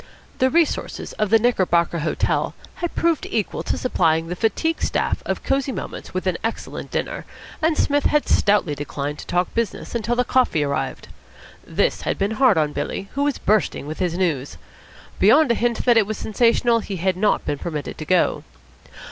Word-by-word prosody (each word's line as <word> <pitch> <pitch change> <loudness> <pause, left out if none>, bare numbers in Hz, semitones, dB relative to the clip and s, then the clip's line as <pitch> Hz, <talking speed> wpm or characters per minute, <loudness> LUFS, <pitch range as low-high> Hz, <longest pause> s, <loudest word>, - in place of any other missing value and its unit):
The 260 - +4
resources 330 +2 0
of 215 -1 +1
the 225 - +6
Knickerbocker 180 -7 +2
Hotel 155 0 0 0.2
had 345 -1 -4
proved 335 -2 +1
equal 215 -4 -2
to - - -2
supplying 165 -9 +1
the 180 - -3
fatigued 320 - 0
staff - - 0
of - - -2
Cosy 270 0 0
Moments - - -6
with 185 0 -3
an 185 -2 0
excellent 225 0 -4
dinner, - - -3 0.4
and 320 0 +2
Psmith 290 0 +1
had 300 -1 +2
stoutly 200 -7 +3
declined 145 0 -4
to - - -9
talk 180 0 0
business 230 -3 -3
until 235 0 -1
the 250 - +2
coffee 245 - +2
arrived. 140 -1 -3 0.5
This - - 0
had - - -2
been 195 +2 0
hard 255 -3 +4
on 150 -2 +1
Billy, 195 - -4
who 280 - 0
was 290 -3 0
bursting 210 -7 +1
with 155 +2 -6
his 175 -2 -1
news. 150 -8 -1 0.6
Beyond 260 +7 +5
a - - +5
hint 235 0 -1
that 240 -2 +5
it 215 -3 +4
was 215 - -3
sensational 235 +1 +2
he 205 -2 -5
had 185 +1 0
not 205 +3 +1
been 145 - -2
permitted 155 -4 -5
to 155 - -5
go. 180 +2 +2
210 Hz, 185 wpm, -22 LUFS, 170-245 Hz, 0.6 s, the